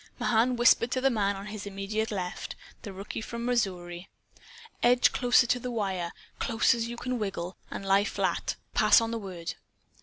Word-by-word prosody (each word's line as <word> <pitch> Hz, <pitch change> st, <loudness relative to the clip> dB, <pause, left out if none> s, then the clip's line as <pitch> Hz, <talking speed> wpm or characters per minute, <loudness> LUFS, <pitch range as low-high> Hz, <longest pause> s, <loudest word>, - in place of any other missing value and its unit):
Mahan 240 Hz, +2 st, +2 dB
whispered 240 Hz, 0 st, +5 dB
to 255 Hz, -, +1 dB
the 270 Hz, +1 st, +3 dB
man 200 Hz, -3 st, +1 dB
on 195 Hz, +1 st, -7 dB
his 210 Hz, -1 st, -6 dB
immediate 200 Hz, +3 st, -2 dB
left, 185 Hz, -4 st, -4 dB, 0.3 s
the 205 Hz, -, -7 dB
rookie 195 Hz, +3 st, -6 dB
from 235 Hz, +1 st, -5 dB
Missouri: 180 Hz, -7 st, -2 dB, 0.7 s
"Edge 245 Hz, +1 st, +5 dB
closer 245 Hz, 0 st, +4 dB
to 245 Hz, +1 st, +1 dB
the 250 Hz, -, -4 dB
wire 190 Hz, -7 st, -2 dB, 0.3 s
close 230 Hz, -1 st, +3 dB
as 230 Hz, 0 st, -2 dB
you 235 Hz, 0 st, -6 dB
can 250 Hz, 0 st, -3 dB
wiggle, 190 Hz, -3 st, -3 dB
and 195 Hz, -, -6 dB
lie 195 Hz, +1 st, +4 dB
flat. -, -, -1 dB, 0.2 s
Pass 215 Hz, -1 st, +6 dB
on 230 Hz, 0 st, -2 dB
the 230 Hz, -, -2 dB
word." 180 Hz, -5 st, -6 dB
215 Hz, 180 wpm, -28 LUFS, 195-235 Hz, 0.7 s, Pass